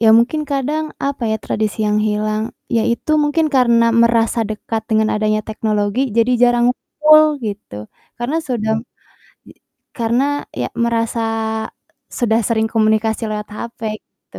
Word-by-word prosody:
Iya 225 - +4
mungkin 255 +7 +1
kadang 285 +3 -1 0.2
apa 280 -2 -3
ya, 220 - +1
tradisi 215 0 -2
yang 210 0 +2
hilang, 215 +1 -1 0.3
ya 225 - +3
itu 235 +6 -2
mungkin 300 +2 +1
karena 235 -3 +4 0.2
merasa 230 0 +2
dekat 220 +1 -4
dengan 220 0 +3
adanya 215 0 +1
teknologi, 215 0 -1 0.2
jadi 230 +2 +3
jarang 240 -1 +4
ngumpul, 310 +4 +4 0.2
gitu. 205 - -6 0.4
Karena 245 +6 -2
sedang 220 -3 0 0.7
i - - -13 0.4
karena 235 +2 +1 0.4
ya 120 - -1 0.2
merasa 230 0 -1 1.0
sudah 230 -2 +2
sering 220 -1 +1
komunikasi 220 0 +1
lewat 210 0 -4
HP 235 +2 -7 0.2
itu, - - -17
230 Hz, 140 wpm, -18 LUFS, 215-245 Hz, 1.0 s, Iya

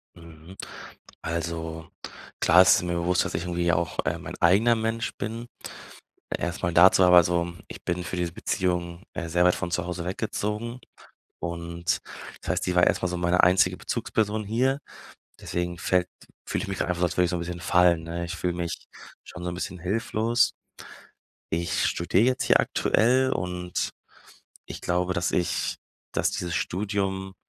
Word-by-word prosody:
Mhm. 85 +2 -13 0.7
Also 80 0 -4 0.5
klar, 90 +2 +7
es 95 - +7
ist - - -1
mir 85 0 -1
bewusst, 85 +1 +1
dass - - -4
ich 85 - -1
irgendwie 85 -1 0
auch, 85 +2 -1
äh, 80 +2 0
mein 90 - -7
eigener 105 +8 +5
Mensch 115 0 -2
bin. 115 +3 -5 0.9
Erst 85 +2 -4
mal 85 -2 0
dazu, 95 +2 +7
aber 90 -1 +8
so, 85 0 0
ich - - -10
bin 90 0 -1
für 90 - -4
diese 85 -1 -2
Beziehung, 90 0 -2
äh, 85 - -4
sehr 90 +1 +3
weit 90 - +4
von 85 - -4
zu 90 -1 -1
Hause 90 -1 -4
weggezogen 105 +4 -3 0.6
und 85 +2 -2 0.4
das - - -5
heißt, - - 0
sie 90 - -1
war 90 - +5
erst - - +1
mal 90 - +1
so 90 - -3
meine 90 +1 +3
einzige 90 +2 +4
Bezugsperson 110 0 -1
hier, 130 +7 +1 0.6
deswegen 85 0 -3
fällt 90 0 +1 0.4
fühle - - -2
ich - - -5
mich 95 - -3
grad - - -1
einfach 90 -1 -1
als 85 - -1
würde 90 - +4
ich 85 - -2
so 90 - -1
'n - - -3
bisschen 85 0 -5
fallen, 85 -2 +3
ne? 85 +1 -4
Ich 85 +1 -5
fühle 90 0 -1
mich 85 -1 -4 0.4
schon 85 - -10
so 90 - -2
'n 85 - -5
bisschen 90 0 -5
hilflos. 115 +4 +1 1.0
Ich 85 +1 0
studiere 90 +5 +2
jetzt 130 +1 +1
hier - - +5
aktuell 130 +3 +2
und 90 -3 -2 0.8
ich - - -7
glaube, 90 +1 0
dass 85 0 0
ich 90 - 0 0.4
dass - - +1
dieses 85 -1 -3
Studium 95 0 -2
90 Hz, 175 wpm, -26 LUFS, 85-95 Hz, 1.0 s, aber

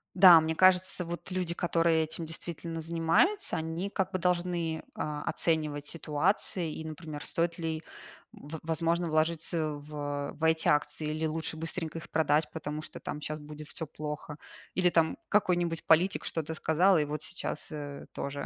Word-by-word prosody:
Да, 180 -3 +10
мне 160 0 -1
кажется, 185 -1 +4
вот 170 +3 -6
люди, 180 -2 -1
которые 165 -2 +2
этим 160 +1 -4
действительно 165 0 -5
занимаются, 170 - +2
они 160 +4 -3
как 190 -1 -1
бы 185 - 0
должны, 175 -2 0
а, 150 -1 -3
оценивать 150 -3 0
ситуации 165 +2 0
и, - - -6
например, 155 -1 -7
стоит 170 0 0
ли, 160 -1 -3 0.5
м, - - -13
в 160 +1 -6
возможно, 165 +1 0
вложиться 155 0 0
в 145 -1 -4
в 160 - -9
эти 160 0 +3
акции, 150 +1 +1
или 155 +1 -1
лучше 160 0 -3
быстренько 165 0 -4
их 165 - -12
продать, 155 -1 +2
потому 150 -1 -4
что - - -9
там 150 - -5
щас 155 +1 -4
будет 150 0 -9
всё 160 - -4
плохо, 150 0 -6 0.4
или 180 0 +3
там 165 -2 +2
какой-нибудь 175 -5 +1
политик 175 +5 +3
что-то 160 -1 -2
сказал, 175 +5 +4
и 150 - +2
вот 150 0 -4
сейчас, 180 - -5
э, 145 -2 -6
тоже 140 0 -4
160 Hz, 165 wpm, -30 LUFS, 155-170 Hz, 0.5 s, Да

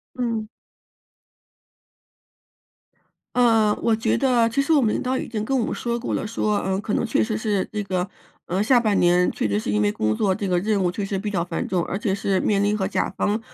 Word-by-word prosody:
嗯。 230 -3 -2 2.9
呃， 225 -4 +4
我 230 - +2
觉 225 - 0
得 245 -4 +3
其 230 - 0
实 275 +4 +1
我 295 - +5
们 215 -3 +2
领 - - -1
导 260 +1 -1
已 - - -4
经 215 -2 -3
跟 270 +4 0
我 235 - +1
们 - - -3
说 235 -1 -2
过 245 - -3
了， - - -2
说， 210 -1 0
呃， 190 +1 -1
可 210 - -3
能 235 - 0
确 - - +1
实 215 -1 -1
是 210 -3 0
这 210 - -2
个， 185 -1 -2 0.4
呃， 185 +3 -1
下 240 +4 +4
半 215 -3 +1
年 175 +1 +3
确 - - -2
实 100 +1 0
是 105 - -3
因 105 0 +1
为 105 0 +2
工 110 0 0
作 195 -3 +1
这 200 0 -3
个 180 -1 +2
任 205 +1 0
务 180 - +2
确 200 +3 -4
实 195 0 -3
比 205 +2 -3
较 175 -4 -1
繁 170 -1 -3
重， 180 -2 0
而 195 - -4
且 205 -1 -1
是 195 -1 0
面 200 -1 +1
临 210 +1 +1
和 190 -2 -1
甲 - - 0
方 210 +2 0
210 Hz, 255 characters per minute, -23 LUFS, 185-230 Hz, 2.9 s, 我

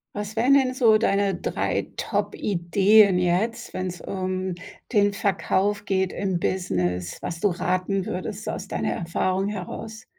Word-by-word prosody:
Was 210 +1 -5
wären 245 +5 +4
denn 260 -2 +4
so 230 -4 +5
deine 200 -3 +1
3 - - -2
Top-Ideen 195 +1 +3
jetzt, 205 +7 0
wenn's 180 -2 -4
um 185 -1 -3 0.4
den 205 -2 +4
Verkauf 205 +1 0
geht 190 -2 0
im 190 -2 -1
Business, 90 - -1
was 170 - -4
du 205 - +3
raten 185 +2 -1
würdest 205 +4 -5
aus 195 - -5
deiner - - -1
Erfahrung 185 +3 -1
heraus? 215 +3 -6
195 Hz, 135 wpm, -24 LUFS, 180-210 Hz, 0.4 s, so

